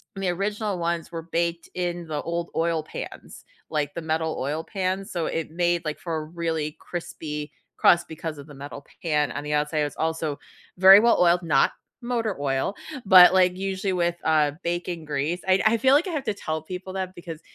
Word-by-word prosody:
and 195 - -5
the 185 - +1
original 200 +2 -2
ones 170 -1 -2
were 165 -1 -4
baked 170 +1 -2
in 175 -1 -3
the 150 -2 -3
old 170 0 -3
oil 165 -1 +1
pans, 155 - -9 0.2
like, 150 -2 -1
the 170 - -5
metal 160 0 -1
oil 150 +4 -2
pans, 190 +2 -3
so, 170 -3 -2
it 165 -1 -3
made, 175 0 +1
like, 155 -1 -3
for 170 -2 -3
a 155 - -2
really 160 -1 -3
crispy 150 -4 -6 0.3
crust 175 - +4
because 160 -1 -6
of 140 - -11
the 145 - -12
metal 140 +1 -8 0.2
pan, 150 -3 +1
on - - -5
the 150 0 -3
outside 150 +1 0
it's 145 -1 -1
also 160 -2 -2 0.4
very 190 +2 +10
well 235 +2 +4
oiled, 175 0 +4
not 150 -5 +3 0.3
motor 235 -4 -1
oil, 135 +5 0 0.3
but, 185 -2 +9
like, 180 -1 +4
usually 190 0 -2
with, 175 -1 +1
uh, 155 -2 +3
bacon 175 -1 -3
grease. 150 +4 -2
I'd 190 +1 +4
I 230 - +3
feel, 260 +3 +4
like, 300 +6 +4
I - - -3
have 300 -4 -2
to 220 -5 -1
tell 160 -5 -4
people 185 +2 -7
that 190 -1 -3
because 170 -2 -8
170 Hz, 200 wpm, -25 LUFS, 155-185 Hz, 0.4 s, very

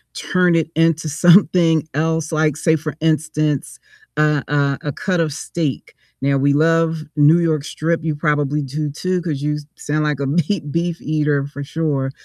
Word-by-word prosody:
turn 180 -2 +1
it 160 -1 0
into 165 -1 +2
something 165 0 +4
else? 160 +1 -1
Like, 155 -2 +1
say 160 0 +2
for 150 -1 -5
instance, 155 -2 -1 0.4
a 150 -1 +2
a 140 -1 0
a - - -1
cut 180 +5 -2
of 160 -2 0
steak. 155 -2 -4 0.3
Now 140 +1 +1
we 140 +1 +2
love 165 +1 +2
New 150 +2 +5
York 160 -4 0
strip, 160 +2 -2
you 160 -2 -1
probably 150 -1 0
do 145 +3 -3
too, 180 +5 -2
'cause 155 -5 -3
you 150 0 -1 0.2
sound 155 +1 -2
like 150 -2 -1
a 140 - -1
meat 150 +1 -1
beef 170 +1 -2
eater 150 -2 0
for 140 0 -7
sure, 140 -3 -2
155 Hz, 170 wpm, -19 LUFS, 145-165 Hz, 0.4 s, New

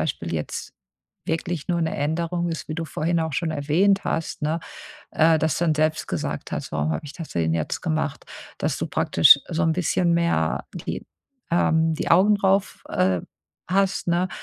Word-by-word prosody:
Beispiel 85 - -3
jetzt 75 - -5 0.5
wirklich 165 -1 -3
nur 170 -1 +1
'ne 160 -1 -1
Änderung 170 +4 -1
ist, 165 - -5
wie 155 - -3
du 165 0 -3
vorhin 165 +3 -1
auch 160 -2 -2
schon 165 +2 -1
erwähnt 160 +7 +2
hast, 160 -2 -3
ne, 160 +2 0 0.5
äh, 160 0 +4
dass 155 0 0
du 175 - +1
dann 155 -2 +2
selbst 155 +1 0
gesagt - - -4
hast: - - -4
„Warum 75 +2 0
hab - - -4
ich 145 - -8
das 165 - -7
denn 80 -1 0
jetzt 80 -2 -2
gemacht?“ 155 -3 -2 0.3
Dass - - -1
du - - -3
praktisch 85 +11 +6
so 175 0 -1
'n 160 -1 +3
bisschen 175 0 +1
mehr 170 0 +1
die - - -5 0.4
ähm, 160 -1 +2
die - - -3
Augen 205 +3 +6
drauf, 195 0 +1
äh, 90 -1 +2 0.5
hast, 195 -1 +1
ne? 175 +2 +2
160 Hz, 185 wpm, -24 LUFS, 150-175 Hz, 0.5 s, praktisch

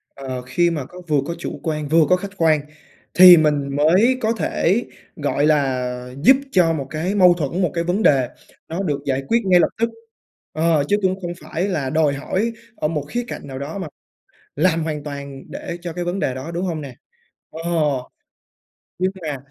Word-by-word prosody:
ờ, 130 -2 -5
khi 150 +8 +1
mà 150 -6 -3
có 180 +5 -12
vừa 150 -2 +2
có 170 +3 -4
chủ - - -6
quan 155 -3 -2
vừa 160 +1 +4
có 180 - +6
khách 195 +2 -7
quan, 155 -3 +3 0.5
thì 180 -1 +10
mình 145 -3 +1
mới 185 - +4
có 225 +1 +1
thể, 220 0 0 0.3
gọi 145 0 0
là, 125 -4 0
giúp 265 +10 +7 0.2
cho 170 -3 +4
một 140 -3 -4
cái 170 +6 -2
mâu 180 -3 +6
thuẫn, 170 +2 -2
một 175 - +1
cái 170 -1 -1
vấn 180 +5 0
đề 130 -4 +4 0.4
nó 175 +5 -3
được 145 -5 -1
giải 135 0 -1
quyết 230 - +3
ngay 180 -2 +5
lập - - +3
tức. 230 +1 +1 0.6
Ờ, 160 -2 +2
chứ 205 - +2
cũng 190 0 0
không 175 -1 -4
phải 175 +4 -3
là 155 -9 -2
đòi 155 -1 +2
hỏi 190 +11 -2 0.2
ở 150 - -1
một 150 -2 -2
khía 240 +1 -2
cạnh - - -7
nào 130 0 -7
đó 145 +6 -5
mà 190 - -4 0.7
làm 165 -3 +2
hoàn 150 -2 -4
toàn 140 -2 -7
để 170 - -6
cho 175 - -5
cái 175 +1 -4
vấn 175 +3 -2
đề 130 - -1
đó, 130 +5 -6
đúng 170 +2 -3
hông 165 -4 -2
nè? 135 -4 -8 0.6
Ờ. 160 - -8 1.4
Nhưng 185 +1 +1
mà 150 -3 -3
160 Hz, 205 wpm, -21 LUFS, 140-180 Hz, 1.4 s, thì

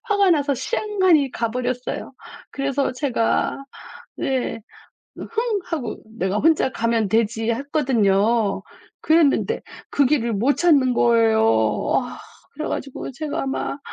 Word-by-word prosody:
화가 405 -4 +2
나서 290 -4 +2
쌩하니 375 - +1
가 230 -1 -2
버렸어요. 250 +1 -3 0.4
그래서 275 0 -1
제가 255 0 -1 0.5
네. 260 -3 -2 0.6
"흥!" 455 -2 -2
하고 280 -10 -4 0.2
'내가 190 0 -1
혼자 315 -2 +3
가면 230 -3 0
되지.' 225 +1 +1
했거든요. 230 -6 +1 0.4
그랬는데 315 -3 +2 0.3
그 285 - +3
길을 245 -5 +1
못 250 +9 +1
찾는 285 -6 +4
거예요. 225 -2 +3 0.6
아 245 - -9 0.3
그래 310 +2 -4
가지고 275 0 -5
제가 295 +1 -4
막 275 +1 -3
265 Hz, 235 characters per minute, -22 LUFS, 230-305 Hz, 0.6 s, 찾는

